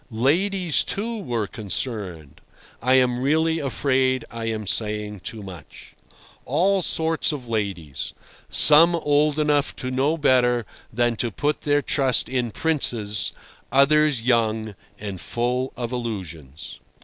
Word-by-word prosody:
Ladies, 170 - +1
too, 225 +3 -3
were 120 - -2
concerned 100 - -4 0.4
(I 130 +1 +3
am 125 -2 +3
really 160 +4 +1
afraid 130 -1 0
I 115 -1 -5
am 110 -1 -3
saying 105 0 -2
too 105 +3 -7
much)—all 145 - -4
sorts 160 -1 0
of 135 -5 -6
ladies, 100 -10 -4 0.3
some 165 +3 +7
old 150 -1 +2
enough 150 -2 +1
to 130 - -5
know 140 +5 +1
better 125 -5 +3 0.3
than 120 0 0
to 120 - -1
put 145 +7 -2
their 145 -1 +1
trust 135 -4 +1
in 125 -2 -1
princes, 110 -8 -1 0.4
others 140 -2 +3
young 110 -3 +1 0.3
and 100 -4 -6
full 125 +2 -2
of 120 -1 -4
illusions. 85 - -6
125 Hz, 125 wpm, -23 LUFS, 110-150 Hz, 0.4 s, some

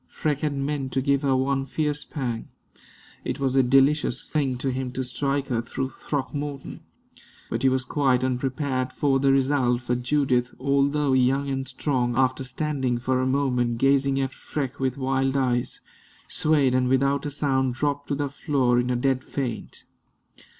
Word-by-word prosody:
Freke 150 -2 -2
had 150 -2 -1
meant 140 -1 -2
to 135 - +1
give 140 +1 +1
her 135 -2 +2
one 135 +1 +1
fierce 150 +1 -1
pang; 125 -6 -4 0.8
it - - -3
was 135 -1 0
a 135 - +6
delicious 135 +4 +2
thing 135 -5 0
to 130 +1 -1
him 130 0 -3
to 130 - -2
strike 135 +3 -2
her 120 -3 0
through 130 +3 -4
Throckmorton; 145 -1 -4 0.7
but 115 - -1
he 135 - +4
was 130 -1 0
quite 130 -3 +1
unprepared 130 0 -1
for 135 -1 +1
the 135 0 +3
result, 135 -2 +2
for 120 - -1
Judith, 125 -1 0
although 140 +1 +2
young 130 +2 +2
and 135 0 -2
strong, 125 -2 -1
after 130 0 +2
standing 130 -2 -1
for 130 +1 0
a 130 - 0
moment 125 -3 +1
gazing 135 +1 +2
at 135 0 -1
Freke 140 -4 -5
with 130 -1 -1
wild 135 0 0
eyes, 125 -2 0 0.5
swayed 145 -4 +3
and 130 0 +2
without 140 +2 +1
a - - -2
sound 135 -3 0
dropped 145 +1 -1
to 145 - -1
the 145 0 -1
floor 135 -4 +1
in 125 0 -1
a 125 - +1
dead 130 +1 0
faint. 130 -5 -5
135 Hz, 170 wpm, -25 LUFS, 130-140 Hz, 0.8 s, a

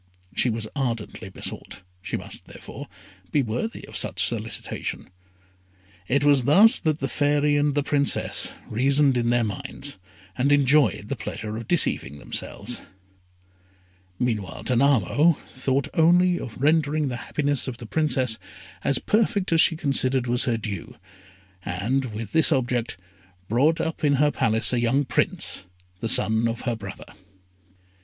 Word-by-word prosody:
She 125 - +2
was 110 -1 -3
ardently 115 -7 -3
besought 95 - -6 0.2
she - - -3
must, - - -8
therefore, - - -10 0.4
be 145 - +2
worthy 125 - -4
of - - -11
such - - +1
solicitation. - - -4 1.0
It 140 +2 +2
was 140 -4 +4
thus 210 - +6
that 155 -3 0
the 135 - -2
Fairy 145 +2 +2
and 145 -1 +1
the 145 - +1
Princess 140 0 0 0.2
reasoned 135 +4 +3
in 120 -1 +1
their 120 0 +3
own - - 0 0.2
minds, 140 -3 -4 0.4
and 135 +3 +1
enjoyed 140 -7 +3
the 140 - -3
pleasure 105 -2 -6
of 115 +1 -6
deceiving 115 - +2
themselves. 105 +9 -4 1.4
Meanwhile, 105 -8 -2
Danamo 140 - +3
thought 130 +1 -1
only 175 +2 +4
of 115 - -8
rendering 150 0 +2
the 120 - -4
happiness 145 0 -1
of 125 -3 -5
the 120 - -9
Princess 130 -4 0 0.4
as 140 - +2
perfect 205 -3 0
as 165 - +5
she 165 - +4
considered 135 -4 0
was 120 +1 0
her 120 -3 +1
due, 100 -5 -6 0.7
and, 115 +10 -1
with 110 -3 -6
this 160 +1 +3
object, 125 - 0 0.5
brought 140 +10 +2
up 160 -1 -3
in 145 -1 +4
her 145 +2 +3
palace 110 -1 +2
a 125 - +2
young 125 +4 +1
Prince, 115 - -1 0.3
the 115 - -3
son 110 +1 +3
of 115 0 -3
her 120 -2 -1
brother. 100 -3 -9
130 Hz, 150 wpm, -24 LUFS, 115-145 Hz, 1.4 s, thus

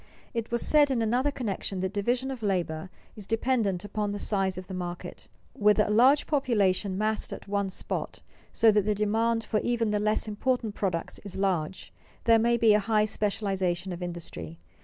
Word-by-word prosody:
_ - - -27 0.3
It 230 -2 -3
was 235 0 0
said 295 -2 +5
in 260 -3 +1
another 245 +6 +1
connection 205 -7 -3
that 190 +1 -2
division 245 +6 0
of 260 -3 -6
labor 180 -4 -1 0.3
is 210 -3 -8
dependent 225 -5 0
upon 205 0 -2
the 205 - -3
size 195 -3 0
of 185 - -6
the 190 - -8
market. 175 -1 -6 0.3
With 210 0 +3
a 210 - +3
large 255 +7 +5
population 200 -9 +1
massed 215 +1 -1
at - - -8
one 200 -1 -1
spot, - - -4 0.3
so 225 - +5
that 210 0 +3
the 210 +1 0
demand 225 +2 +1
for 215 - 0
even 230 -2 0
the 210 - +1
less 215 +1 0
important 220 +1 -1
products 185 -5 -3
is 200 -3 -9
large, 190 -3 -2 0.3
there 230 -1 +5
may 235 +1 +3
be 225 -2 +5
a 210 - +4
high 210 +1 +2
specialization 195 -4 -1
of 175 - -8
industry. 165 - -6
210 Hz, 190 wpm, -28 LUFS, 190-230 Hz, 0.3 s, said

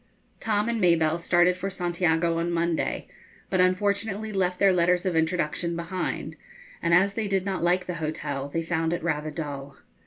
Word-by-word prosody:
Tom 210 0 0
and 235 -2 -1
Mabelle 165 -2 +3
started 175 +1 +3
for 190 +2 -3
Santiago 170 -2 0
on 170 +1 -1
Monday, 170 -1 -1 0.4
but 185 -1 +3
unfortunately 200 +3 0
left 180 -2 0
their 195 -1 +4
letters 180 +1 +2
of 185 -3 0
introduction 170 +1 0
behind; 170 +2 -4 0.4
and 170 - 0
as 195 +3 +4
they 220 0 -2
did 195 -1 0
not 195 -2 -2
like 180 +1 +2
the 180 - -3
hotel, 145 -3 -3
they 165 +3 -2
found 165 0 0
it 170 - -3
rather 155 -2 -1
dull. 145 -3 -6
175 Hz, 175 wpm, -26 LUFS, 165-190 Hz, 0.4 s, their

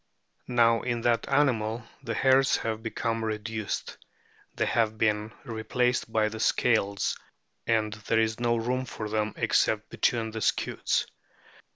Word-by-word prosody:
Now 115 -2 +3
in 120 -1 -2
that 120 +2 +1
animal 120 -5 +1 0.2
the 115 -4 -4
hairs 135 +2 +4
have 110 -1 -3
become 115 0 -2
reduced; 110 0 -4 0.6
they - - +1
have 110 -2 +1
been 105 0 +1
re 110 -2 -5
placed 125 +1 0
by 110 -1 +2
the 110 +1 -6
"scales," 110 -4 +1 0.5
and 110 -2 +1
there 105 +2 0
is 110 0 0
no 120 -1 +2
room 125 +3 -1
for 110 -4 -6
them 110 0 -1
except - - +1
between 115 -2 0
the 110 0 -5
scutes. - - 0
115 Hz, 145 wpm, -28 LUFS, 110-120 Hz, 0.6 s, hairs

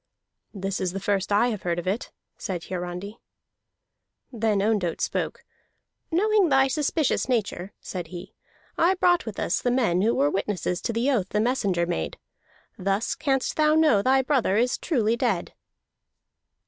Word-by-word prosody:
"This 195 -1 -3
is 180 -1 -1
the 195 - -3
first 195 0 -1
I 210 +4 +4
have 215 -5 -4
heard 175 -1 -1
of 175 - -4
it," 195 +6 -2 0.2
said 180 -5 -5
Hiarandi. 180 +4 -6 1.1
Then 220 -3 +1
Ondott 200 -5 0
spoke. - - -2 0.7
"Knowing 405 +1 +3
thy 270 -1 +4
suspicious 295 0 0
nature," 205 -5 -1
said 180 -3 -6
he, 175 +1 -9 0.5
"I 355 +3 +4
brought 355 -5 +2
with 215 - -5
us - - 0
the 245 - +1
men 230 -8 +2
who 225 +4 +2
were 145 +1 +2
witnesses 185 -2 -2
to - - -2
the 240 +5 +1
oath 205 -8 0
the 210 - 0
messenger 205 -7 +1
made. 80 - -3 0.6
Thus 195 +3 0
canst 270 -3 -1
thou 305 0 +4
know 305 -10 +4
thy 265 +3 +3
brother 255 -7 +1
is 245 +3 +1
truly 235 -9 +1
dead." 230 -8 -1
215 Hz, 160 wpm, -25 LUFS, 185-265 Hz, 1.1 s, I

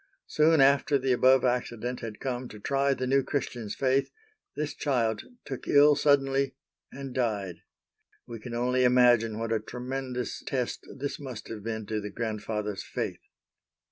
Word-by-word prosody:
Soon 155 0 +4
after 140 +1 +4
the 135 -1 0
above 130 +1 +5
accident 120 0 -1
had 115 -3 -7
come 125 -1 -3
to 105 - -11
try 140 +4 +1
the 130 - -3
new 135 +2 +3
Christian's 120 -6 -3
faith, 135 +1 +1 0.5
this 150 +1 -2
child 115 -7 0 0.2
took 130 -3 -6
ill 145 +1 +6
suddenly 135 -2 +2 0.4
and 135 -1 -7
died. 105 -8 -1 0.7
We 115 -1 -8
can 120 +2 -7
only 125 +2 +1
imagine 120 -3 +4
what 115 0 -2
a 110 - +1
tremendous 125 +2 -4
test 125 -3 -3
this 140 +1 -4
must 130 -6 -8
have 110 -2 -6
been 110 0 -4
to 110 0 -2
the 105 - -5
grandfather's 105 -2 -3
faith. - - -4
125 Hz, 155 wpm, -28 LUFS, 115-135 Hz, 0.7 s, ill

